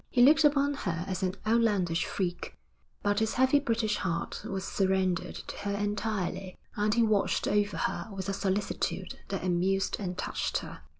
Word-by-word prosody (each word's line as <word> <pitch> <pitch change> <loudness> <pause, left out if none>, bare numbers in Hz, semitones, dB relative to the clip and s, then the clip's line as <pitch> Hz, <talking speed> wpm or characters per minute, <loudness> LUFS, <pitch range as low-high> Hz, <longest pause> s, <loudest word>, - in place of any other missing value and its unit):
He 245 - +4
looked 310 +4 +7
upon 285 -1 +4
her 175 -10 -3
as 185 0 -3
an 185 0 0
outlandish 210 -7 +2
freak, 175 -2 -3 0.5
but 205 0 +2
his 220 0 0
heavy 260 +3 +4
British 230 -5 0
heart 170 -2 -3
was 195 -1 -3
surrendered 190 -3 0
to - - -7
her 200 0 -2
entirely, 205 -2 -2 0.2
and 210 -1 +1
he 235 +2 +3
watched 215 -3 +2
over 205 0 +1
her - - -2
with 195 -1 -5
a 195 - -1
solicitude 195 +1 -2
that - - -3
amused 185 +2 +1
and 180 -3 -4
touched - - -1
her. - - -7
200 Hz, 170 wpm, -29 LUFS, 185-225 Hz, 0.5 s, looked